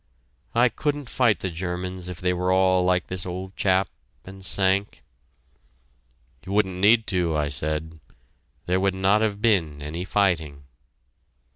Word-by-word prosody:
I 120 +2 +5
couldn't 145 0 -3
fight 115 -8 +2
the 95 - -3
Germans 90 +1 -5
if 90 -1 -7
they 90 0 0
were 90 +1 0
all 95 -1 +3
like 90 0 +1
this 90 -1 -5
old 95 +1 -6
chap 95 -1 +2 0.4
and 95 0 -11
Sank!" 95 +1 0 1.4
"You 95 - -6
wouldn't 95 -3 +1
need 110 +2 +5
to," 85 -5 0
I 75 -1 0
said. 80 +3 -3 0.7
"There 90 +1 +1
would 95 0 +1
not 95 +3 +3
have 105 -1 -1
been 85 -10 +2
any 75 +4 -5
fighting." 80 -8 0
95 Hz, 145 wpm, -24 LUFS, 90-100 Hz, 1.4 s, I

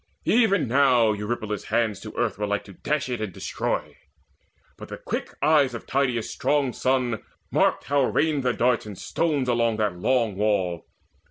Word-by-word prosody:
Even 210 - +3
now 125 -3 +4
Eurypylus' 105 0 -3
hands 110 -3 0
To 110 +1 -10
earth 115 -5 -1
were 105 - -1
like 105 0 -1
to 100 - -13
dash 150 +8 -2
it 120 -3 -3
and 110 -3 -3
destroy; - - -3 0.8
But - - -10
the - - -6
quick - - -5
eyes 145 -5 +4
of 115 - -7
Tydeus' 130 -4 0
strong 140 -1 0
son 130 -3 0 0.3
marked - - +2
How 140 -1 +2
rained 150 0 +1
the 125 -1 +1
darts 120 -2 +1
and 100 -3 -8
stones 150 -6 -1
on 115 -2 +2
that 105 -4 0
long 115 -1 +1
wall. 95 -5 0
120 Hz, 170 wpm, -25 LUFS, 105-135 Hz, 0.8 s, now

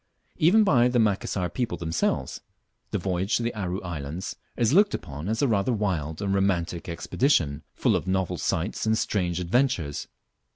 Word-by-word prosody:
Even 195 +8 +5
by 130 - +4
the 125 0 +1
Macassar 100 -4 +1
people 90 0 -2
themselves, 80 -1 -1 0.5
the - - -1
voyage 95 +2 0
to 120 - -3
the 115 - -1
Aru 95 -3 -3
Islands 80 0 -5 0.2
is 120 +2 +2
looked 200 +3 +5
upon 75 +6 -6
as 110 +5 0
a - - +4
rather 105 0 +1
wild 90 -7 -2
and 100 -1 0
romantic 90 -3 0
expedition, 85 - +1
fall - - +2
of - - -2
novel 95 -2 0
sights 95 +7 -1
and 110 0 +3
strange 90 -6 0
adventures. 90 - 0
95 Hz, 165 wpm, -26 LUFS, 85-115 Hz, 0.5 s, Even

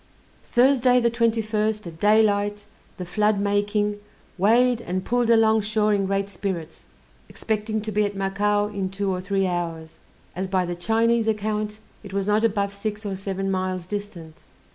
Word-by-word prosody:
Thursday, 250 0 +4
the 235 -1 +2
21st, 220 -2 0
at 165 -1 -9
daylight, 205 0 +2 0.3
the 180 - -5
flood 210 +3 +1
making, 205 +1 0 0.4
weighed 235 +5 +3
and 185 -2 -3
pulled 245 -1 +1
along 220 -1 +4
shore 215 0 +1
in 195 -1 +1
great 195 0 0
spirits, 180 -4 -5 0.4
expecting 215 0 -2
to 215 +1 -4
be 210 +1 +2
at 205 -1 -2
Macao 205 +2 +1
in 195 -2 -3
two 195 0 -2
or 180 -1 -2
three 195 +1 0
hours, 165 -3 -4 0.4
as 190 +2 -3
by 185 -1 0
the 175 - -3
Chinese 225 +5 +1
account 215 0 -1 0.2
it 200 -3 -11
was 195 -1 -1
not 210 +2 +2
above 200 -3 0
six 210 +1 -5
or 195 -1 -3
seven 195 0 -3
miles 185 -1 -2
distant. 185 -5 -7
205 Hz, 165 wpm, -24 LUFS, 195-220 Hz, 0.4 s, Thursday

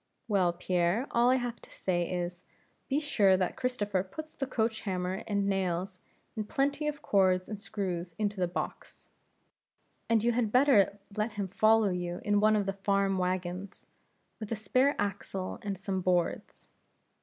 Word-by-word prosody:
"Well, 190 -5 +3
Pierre, 180 +5 +1
all 240 +1 +4
I 255 - +5
have 245 -2 -3
to - - -14
say, 175 -2 -1
is, 175 0 -3 0.5
be 280 +1 +2
sure 205 -11 +3
that 185 -1 -1
Christopher 205 -7 -1
puts 310 +12 -9
the 270 - -3
coach 225 -3 -1
hammer 185 0 -2
and 200 -2 0
nails, 185 -1 -1 0.4
and 215 -2 -4
plenty 285 +2 0
of 295 -1 -4
cords 185 -2 +3
and 210 -2 -6
screws 185 -5 -4
into 205 -2 -1
the 180 - +2
box. 175 - -6 1.0
And 225 -2 +3
you 240 - +3
had 230 -3 0
better 250 -6 +4 0.2
let 215 +1 -1
him 200 -2 -3
follow 215 +2 +4
you 175 -1 -3
in 205 -1 +3
one 215 +1 +4
of 205 -2 +1
the 195 - -1
farm 195 -1 +1
wagons, 185 +1 -3 0.5
with 215 -1 -7
a - - +1
spare 255 +7 +2
axle 195 -2 -3
and 200 -2 -3
some 190 0 -2
boards." 175 -2 -1
200 Hz, 165 wpm, -30 LUFS, 185-225 Hz, 1.0 s, I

